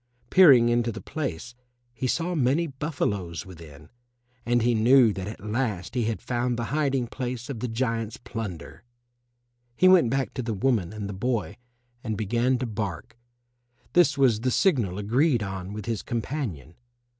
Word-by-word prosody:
Peering 140 -11 +7
into 120 0 +1
the 110 - -7
place 120 - -5 0.4
he 120 +2 -3
saw 170 +7 -1
many 145 +2 +2
buffaloes 130 - -3
within, 80 -5 -13 0.6
and 120 -1 +2
he 120 0 +3
knew 115 0 +5
that 95 -1 -5
at 105 -1 -8
last 105 -5 -2
he 120 -4 0
had 115 0 -3
found 120 0 -1
the 120 - -2
hiding 135 -4 +1
place 125 +1 -5
of 120 - -6
the 125 - -2
giant's 115 -2 -2
plunder. 110 -9 -7 0.9
He 185 - +4
went 185 -10 +6
back 135 +2 -1
to 130 - -3
the 115 -3 -3
woman 100 -4 0
and 105 -2 -5
the 100 - -5
boy 105 -1 -2 0.5
and 110 -4 -3
began 120 +4 +1
to 125 - -3
bark. 105 -1 -5 0.8
This 170 -5 +4
was 125 -6 +3
the 130 +3 0
signal 120 - +1
agreed 120 +4 +2
on 95 -1 -5
with 105 -1 -6
his 115 -3 -2
companion. 115 - -4
115 Hz, 165 wpm, -26 LUFS, 105-130 Hz, 0.9 s, Peering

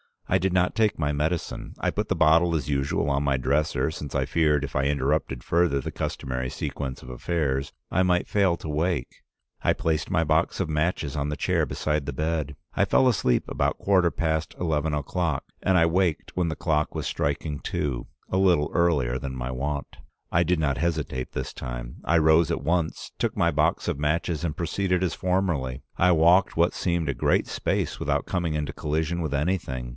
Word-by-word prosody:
"I - - +3
did 95 0 0
not 90 0 +2
take 110 -2 +2
my 75 -2 0
medicine. 75 +3 -2
I - - 0
put - - -2
the - - 0
bottle 85 +2 +4
as 75 -4 -2
usual 70 0 0
on 70 0 +1
my 70 -2 +2
dresser, 70 +2 +1
since 75 -3 -7
I - - +1
feared 75 -3 +2
if 75 - -5
I 70 - +1
interrupted 70 -2 0
further 85 -5 +2
the - - -5
customary 65 0 -3
sequence 65 0 -5
of 60 - -10
affairs 70 0 -1 0.2
I 90 - +2
might 90 -1 +2
fail 95 -4 +3
to 80 - -7
wake. 75 -2 -1 0.4
I - - +3
placed 80 -1 -1
my 90 -4 +2
box 80 +4 +1
of 85 - -2
matches 75 -2 -1
on 70 0 -1
the 75 - -2
chair - - +1
beside 75 -2 -1
the 70 - -4
bed. 75 -1 -2 0.2
I - - +2
fell 130 - +4
asleep 65 - +2
about - - 0
quarter 95 -3 +3
past 80 -2 -1
eleven 80 -2 0
o'clock, 75 0 -1 0.2
and 95 - +3
I 85 - +5
waked 85 -1 +1
when 90 -2 +1
the 80 - -2
clock 75 -2 0
was - - -3
striking 70 +1 -2
two 65 -5 -3
— - - -38
a 95 - +1
little 90 -6 +3
earlier 70 -8 +2
than 65 0 -5
my 65 0 -4
wont. 70 +3 -4 0.3
I 85 - +4
did 85 0 +1
not 70 -4 +1
hesitate 80 -6 -2
this 65 0 -4
time. - - -6
I 85 - +3
rose 80 0 +4
at - - -2
once, 80 +1 -1
took - - 0
my - - +2
box - - +1
of - - -2
matches 80 +2 0
and 80 -2 -3
proceeded 90 +1 0
as 90 - 0
formerly. 90 -9 -1
I 90 0 +4
walked 85 +4 +4
what 85 +2 +3
seemed 85 -4 -1
a - - +1
great - - +1
space - - -1
without - - 0
coming 85 -4 -1
into 75 -1 -2
collision 80 +3 -1
with 80 -3 -2
anything. 70 -5 -1
80 Hz, 200 wpm, -26 LUFS, 70-85 Hz, 0.4 s, I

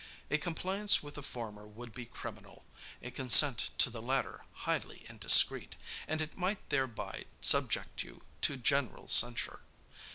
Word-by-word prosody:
A 150 - -1
compliance 190 +5 0
with 145 0 -12
the 145 - -10
former 110 -6 -9
would 115 +2 -14
be 120 0 -11
criminal, 110 -4 -13 0.4
a - - -9
consent 130 0 +4
to - - +4
the 115 -1 -10
latter 130 +3 -5 0.2
highly - - -5
indiscreet; - - +4 0.3
and 155 +1 -4
it 155 0 -8
might 190 +2 -5
thereby 130 -5 -5
subject - - +1
you - - -14 0.2
to 140 - +1
general 140 +1 -3
censure. 120 0 +3
130 Hz, 140 wpm, -30 LUFS, 115-150 Hz, 0.4 s, consent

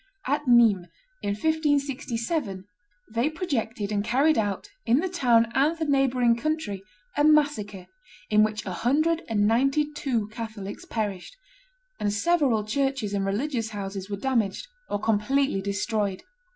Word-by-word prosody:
At 290 +1 -1
Nimes, 225 -7 +5 0.3
in - - -2
1567, 280 - -1 0.5
they 235 +6 +1
projected 240 - -3
and 205 -1 0
carried 275 +8 +3
out, 205 -5 -1 0.2
in 240 - +3
the 370 - 0
town 240 -10 +3
and 295 +6 +2
the 320 - -1
neighboring 260 -4 +3
country, 235 -7 -2 0.3
a 290 - +2
massacre 285 -11 +2 0.5
in 215 0 +5
which 215 0 -2
a 190 - -4
hundred 310 - +1
and 205 -2 +2
ninety 275 +7 +2
two 250 -8 -1
Catholics 215 -3 -7
perished; 210 - -4 0.6
and 205 - 0
several 245 -2 +2
churches 270 -2 -1
and 195 -1 0
religious 230 +2 -1
houses 195 -2 -6
were 200 - -3
damaged 230 - 0 0.2
or 205 - -1
completely 225 +2 +1
destroyed. 200 0 -2
235 Hz, 140 wpm, -26 LUFS, 205-285 Hz, 0.6 s, Nimes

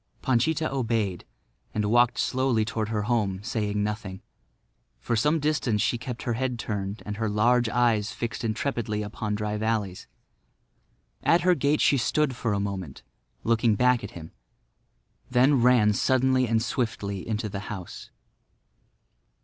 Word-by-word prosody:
Panchita 155 +6 +1
obeyed 115 -8 -1 0.5
and 105 0 0
walked 120 0 +4
slowly 130 -4 +1
toward 110 0 -3
her 105 -2 -1
home, 105 -5 0
saying 105 -1 -1
nothing. 105 -3 -4 0.8
For 120 - -1
some 150 +8 +2
distance 145 -7 0
she 120 +3 +1
kept 125 -1 -6
her 120 - -1
head 125 +1 -2
turned 100 -1 -4
and 105 0 -5
her 110 -1 -1
large 120 +3 +3
eyes 115 -3 +1
fixed 115 0 -4
intrepidly 110 -2 -2
upon 105 0 -3
Dry 105 0 -2
Valley's. 105 -4 -2 1.1
At 170 +1 +3
her 180 +1 +4
gate 145 -1 +1
she 140 - +4
stood 135 +2 +1
for 115 -2 -2
a 100 - 0
moment 95 -7 -5 0.4
looking 115 -1 +2
back 125 0 +3
at 100 - -5
him, 80 -1 -10 1.0
then 130 +1 +4
ran 120 -4 +5
suddenly 130 +2 +2
and 115 0 +1
swiftly 110 -6 -3
into 110 0 -2
the 100 -1 -5
house. 95 -4 -8
115 Hz, 145 wpm, -26 LUFS, 105-125 Hz, 1.1 s, ran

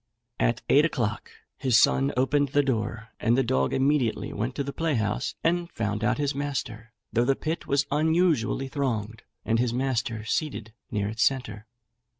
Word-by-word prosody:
At 115 0 +1
eight 145 - +5
o'clock 120 -10 -1 0.3
his 130 -4 +3
son 135 +4 +4
opened 140 +3 +2
the 145 +2 +3
door, 115 -3 -2
and 120 +2 +2
the 135 - +3
dog 65 - +1
immediately 135 -4 +1
went 120 +5 -3
to 140 - -1
the 140 0 -5
playhouse 125 -8 -1
and 170 +1 +1
found 105 -1 -2
out 105 - +2
his 145 -1 0
master, 115 -5 -4 0.2
though 120 +1 +3
the 135 +2 +2
pit 160 +4 -4
was 140 +1 +2
unusually 155 -4 +2
thronged, 115 -6 -2 0.2
and 115 +1 +1
his 120 -1 0
master 120 -4 -1
seated 110 -5 -2 0.2
near 105 -3 -1
its 110 +1 -4
centre. 115 -5 0
125 Hz, 165 wpm, -26 LUFS, 110-140 Hz, 0.3 s, eight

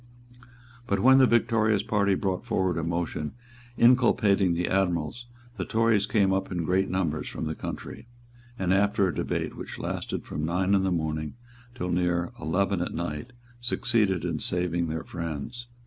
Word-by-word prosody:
But 100 -3 +1
when 130 +4 +7
the 130 - +6
victorious 110 -3 +2
party 100 -3 +2
brought 95 +1 -2
forward 95 -8 0
a - - -2
motion 85 -2 -2 0.4
inculpating 110 -7 +4
the 90 +1 0
admirals, 95 +4 -1 0.3
the 95 - -2
Tories 110 0 +2
came 100 -4 +2
up 95 0 -1
in 90 -2 -2
great 95 +4 +1
numbers 85 -5 -1
from - - -5
the 80 - -2
country, 110 +7 -7 0.5
and, 95 -2 +1
after 100 0 +3
a 90 - -2
debate - - -2
which - - -7
lasted - - -4
from 75 - -4
nine 90 +4 +1
in 100 - +4
the 95 - +1
morning 80 -2 -2 0.4
till 90 -7 -3
near 85 0 0
eleven 90 +4 0
at 90 - -3
night, 85 +6 -4 0.3
succeeded 105 -6 +1
in 90 - -2
saving 85 -1 +1
their 80 0 -3
friends. 85 - -6
95 Hz, 165 wpm, -27 LUFS, 85-105 Hz, 0.5 s, when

